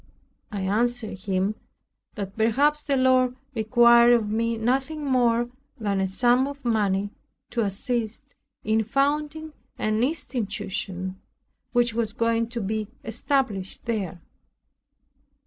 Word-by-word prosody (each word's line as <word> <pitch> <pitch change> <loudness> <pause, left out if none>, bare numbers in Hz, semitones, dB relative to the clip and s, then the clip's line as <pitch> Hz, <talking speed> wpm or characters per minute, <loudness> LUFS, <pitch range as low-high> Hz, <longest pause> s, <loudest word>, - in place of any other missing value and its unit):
I 205 -2 -3
answered 220 +2 0
him, 195 +1 0 0.6
"that 200 -2 -5
perhaps 280 +7 +3
the 280 -2 0
Lord 255 -1 +3 0.2
required 235 +1 +6
of 225 -3 +2
me 230 +1 0
nothing 265 +6 -1
more 240 -2 +2 0.3
than 200 -3 0
a 190 - +1
sum 245 +6 +3
of 280 -2 -9
money 205 -3 +1 0.4
to 240 - 0
assist 220 +2 -2 0.3
in 220 +1 +2
founding 295 +6 -1 0.2
an 215 +2 0
institution 195 - -3 0.5
which 240 -2 +2
was 220 -2 -1
going 230 -1 +1
to 235 -1 -4
be 215 +1 -2 0.2
established 225 -4 -1
there." 200 -7 -2
230 Hz, 115 wpm, -25 LUFS, 210-255 Hz, 0.6 s, required